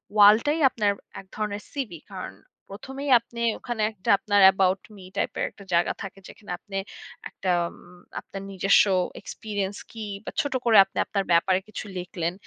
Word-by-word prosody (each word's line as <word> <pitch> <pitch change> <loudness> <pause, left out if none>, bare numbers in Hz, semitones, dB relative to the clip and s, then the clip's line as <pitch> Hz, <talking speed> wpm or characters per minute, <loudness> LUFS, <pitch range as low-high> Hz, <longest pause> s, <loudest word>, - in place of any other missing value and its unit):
ওয়ালটাই 215 +9 +6
আপনার 210 -4 +1 0.3
এক 195 - -11
ধরনের 210 -1 -3
সিভি, 220 - -5
কারণ 185 - -6 0.4
প্রথমেই 270 +7 -6
আপনি 235 0 -9 0.2
ওখানে 240 -3 -4
একটা 200 -3 -7
আপনার 205 0 +2
'অ্যাবাউট 190 0 +4
মি' 185 -2 -12
টাইপের - - -1
একটা 200 - -15
জায়গা 170 0 +3
থাকে 195 0 -8
যেখানে 205 - -11
আপনি 195 -1 -7 0.5
একটা 185 - -2 0.2
উম 180 +1 -17 0.2
আপনার 195 - -9
নিজস্ব 195 +1 +5 0.4
এক্সপেরিয়েন্স 205 -2 -4
কি? 225 -2 -6 0.2
বা - - -4
ছোট 285 -3 -3
করে 230 -2 +6
আপনি 195 - -14
আপনার 200 -1 -1
ব্যাপারে 185 +2 +4
কিছু 215 - -7
লিখলেন। 175 -1 -3
200 Hz, 160 wpm, -25 LUFS, 190-220 Hz, 0.5 s, ওয়ালটাই